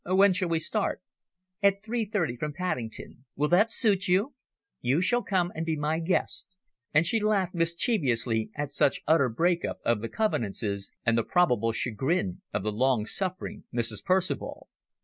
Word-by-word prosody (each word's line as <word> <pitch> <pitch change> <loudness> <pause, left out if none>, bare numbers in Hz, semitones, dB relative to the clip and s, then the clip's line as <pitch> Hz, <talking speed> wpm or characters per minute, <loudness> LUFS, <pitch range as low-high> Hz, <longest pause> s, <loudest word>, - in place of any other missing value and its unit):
"When 190 +2 +4
shall 185 -1 -1
we 165 - +2
start?" 195 +6 -1 0.6
"At 200 0 +3
three 230 +1 -1
thirty 190 - -1
from 150 +4 -4
Paddington. 125 - -4
Will 150 +2 +1
that 205 +6 +4
suit 205 -6 +2
you? 195 +10 +2 0.5
You 130 +6 +1
shall 240 +7 +2
come 180 -5 0
and 160 - -3
be 165 -1 -1
my 155 +2 -1
guest." 185 +2 -2 0.3
And 155 +2 +4
she 225 +7 +2
laughed 205 -4 +1
mischievously 140 - +1
at 145 -1 -3
such 140 - +2
utter 155 -5 +4
break 170 +9 +1
up - - -3
of 115 -3 +2
the 115 - -4
convenances 105 - -2
and 115 -1 +3
the 115 - +2
probable 125 - +2
chagrin 165 - -1
of - - -2
the 105 - -1
long 120 0 +1
suffering 190 - -4
Mrs. 115 -4 -3
Percival. 185 0 -1
165 Hz, 170 wpm, -28 LUFS, 125-190 Hz, 0.6 s, When